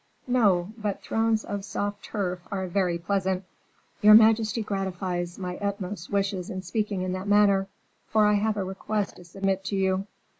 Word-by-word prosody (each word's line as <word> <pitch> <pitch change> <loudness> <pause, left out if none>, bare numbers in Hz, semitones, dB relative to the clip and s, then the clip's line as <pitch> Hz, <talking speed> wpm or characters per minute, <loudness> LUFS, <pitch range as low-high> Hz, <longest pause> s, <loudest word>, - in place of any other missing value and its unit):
"No; 210 -6 +2
but 210 -2 -3
thrones 225 -1 +1
of 200 -1 -4
soft 205 +1 -3
turf 180 -4 -2
are 190 -2 -2
very 180 -1 0
pleasant." 190 +1 -1 0.6
"Your 210 +1 +9
majesty 220 0 +5
gratifies 185 -3 -3
my 180 -2 -4
utmost 200 -3 -4
wishes 195 -2 -1
in 185 0 -5
speaking 200 0 -2
in 185 - -2
that 185 +2 -4
manner, 200 -1 +4 0.4
for 215 -1 +3
I 210 - +4
have 210 +1 +1
a 200 - 0
request 195 +2 -3
to 180 - -12
submit 195 +2 -2
to 200 - -2
you." 190 0 0
195 Hz, 165 wpm, -26 LUFS, 185-210 Hz, 0.6 s, Your